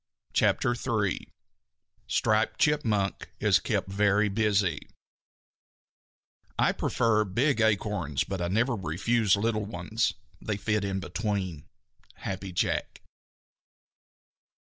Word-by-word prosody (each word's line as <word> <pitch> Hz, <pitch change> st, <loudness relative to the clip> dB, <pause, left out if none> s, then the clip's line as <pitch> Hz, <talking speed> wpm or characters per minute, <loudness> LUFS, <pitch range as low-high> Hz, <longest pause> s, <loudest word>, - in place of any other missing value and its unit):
] -, -, -42 dB
CHAPTER 120 Hz, -, +2 dB
III 110 Hz, -6 st, -2 dB, 0.8 s
STRIPED 110 Hz, 0 st, +1 dB
CHIPMUNK 110 Hz, -10 st, +1 dB
IS -, -, +4 dB
KEPT -, -, -1 dB
VERY 105 Hz, +2 st, +2 dB
BUSY 100 Hz, -6 st, 0 dB, 1.7 s
I -, -, +3 dB
prefer 110 Hz, -2 st, +1 dB
big 115 Hz, +6 st, +1 dB
acorns 105 Hz, -9 st, +1 dB
but 95 Hz, -2 st, -4 dB
I 85 Hz, -, 0 dB
never 115 Hz, +7 st, +1 dB
refuse 100 Hz, +4 st, +1 dB
little 105 Hz, +1 st, 0 dB
ones. 105 Hz, +3 st, -1 dB, 0.3 s
They 105 Hz, -2 st, -2 dB
fit 105 Hz, 0 st, 0 dB
in 95 Hz, -1 st, -2 dB
between. 95 Hz, -6 st, -3 dB, 0.6 s
_Happy 95 Hz, 0 st, -4 dB
Jack. 85 Hz, -, -1 dB
105 Hz, 100 wpm, -28 LUFS, 95-110 Hz, 1.7 s, IS